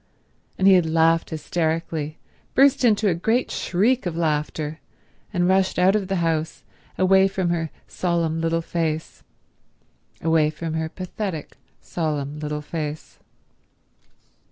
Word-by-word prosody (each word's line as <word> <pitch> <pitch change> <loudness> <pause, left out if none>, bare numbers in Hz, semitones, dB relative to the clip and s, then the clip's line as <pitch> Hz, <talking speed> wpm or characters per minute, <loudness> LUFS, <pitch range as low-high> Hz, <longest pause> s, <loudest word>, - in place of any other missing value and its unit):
And 190 - +3
he 195 - +8
had 180 -3 +4
laughed 165 +1 +3
hysterically, 160 -1 -2 0.4
burst 275 0 +5
into 220 -3 +3
a 185 - +3
great 225 +9 0
shriek 215 +5 +1
of 165 -2 -4
laughter, 155 -1 -1 0.5
and 175 -3 +1
rushed 190 0 +2
out 185 +3 +4
of 200 -3 0
the 195 - -1
house, 160 -1 -2 0.3
away 190 +1 +5
from 190 -2 -1
her 165 -2 -1 0.2
solemn 170 -2 -1
little 165 0 0
face—away 160 -1 -3
from 160 +1 -5
her 160 0 -2
pathetic, 185 -2 -5 0.3
solemn 150 -3 -3
little 150 0 -3
face. 155 -1 -6
165 Hz, 125 wpm, -23 LUFS, 155-190 Hz, 0.5 s, he